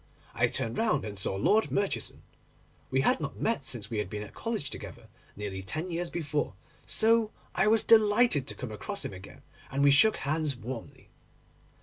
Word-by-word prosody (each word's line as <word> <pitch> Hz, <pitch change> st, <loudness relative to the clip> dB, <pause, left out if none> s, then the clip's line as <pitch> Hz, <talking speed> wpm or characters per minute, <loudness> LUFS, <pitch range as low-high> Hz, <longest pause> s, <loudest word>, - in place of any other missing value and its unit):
I -, -, +2 dB
turned 115 Hz, 0 st, 0 dB
round, 215 Hz, -, +1 dB
and 100 Hz, -2 st, -6 dB
saw 95 Hz, -, 0 dB
Lord 210 Hz, -, +3 dB
Murchison. 200 Hz, -1 st, -2 dB, 0.7 s
We 130 Hz, -, +2 dB
had -, -, +3 dB
not 140 Hz, -3 st, -5 dB
met 225 Hz, -11 st, 0 dB
since 120 Hz, -5 st, -4 dB
we 110 Hz, -, -1 dB
had 105 Hz, -3 st, -3 dB
been 105 Hz, +1 st, -5 dB
at 105 Hz, -, -11 dB
college 225 Hz, -, -3 dB
together, -, -, -9 dB, 0.3 s
nearly 100 Hz, -2 st, -5 dB
ten 155 Hz, -, -4 dB
years 170 Hz, +1 st, -2 dB
before, 150 Hz, -, -2 dB, 0.3 s
so 225 Hz, 0 st, +3 dB, 0.2 s
I 200 Hz, -, +2 dB
was 220 Hz, 0 st, +4 dB
delighted 215 Hz, -, +5 dB
to -, -, -2 dB
come 125 Hz, -4 st, -6 dB
across 200 Hz, -, -3 dB
him -, -, -5 dB
again, 95 Hz, +1 st, -12 dB, 0.3 s
and 140 Hz, +1 st, 0 dB
we 140 Hz, -, +7 dB
shook 215 Hz, +10 st, +6 dB
hands 150 Hz, 0 st, 0 dB
warmly. 120 Hz, 0 st, -8 dB
145 Hz, 185 wpm, -29 LUFS, -, 0.7 s, we